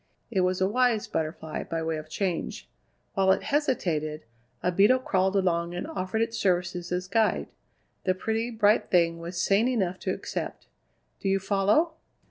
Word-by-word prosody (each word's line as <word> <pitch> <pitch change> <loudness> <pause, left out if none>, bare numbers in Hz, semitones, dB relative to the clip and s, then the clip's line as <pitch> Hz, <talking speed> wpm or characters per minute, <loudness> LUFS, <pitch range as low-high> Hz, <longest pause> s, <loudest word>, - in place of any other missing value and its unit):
It 195 -4 +2
was 185 0 +1
a 190 - +3
wise 235 0 +2
butterfly, 160 0 -3
by 165 -1 -3
way 160 -1 -1
of 155 0 -8
change. 180 0 -3 0.5
While 190 -2 +3
it - - +2
hesitated, 170 - 0 0.4
a 180 - +2
beetle 205 +8 +5
crawled 190 -6 +1
along 175 -2 +1
and 180 - -3
offered 220 -8 -1
its 230 0 -3
services 180 -2 0
as 180 +1 -1
guide. 220 +3 +1 0.6
The 185 - +2
pretty, 225 +4 -1
bright 215 -1 +3
thing 170 -2 +3
was 170 +1 -5
sane 200 +6 +3
enough 190 -8 0
to - - -2
accept. - - -5 0.5
Do 195 - -1
you 195 - +3
follow?" 200 - +2
190 Hz, 165 wpm, -27 LUFS, 175-220 Hz, 0.6 s, beetle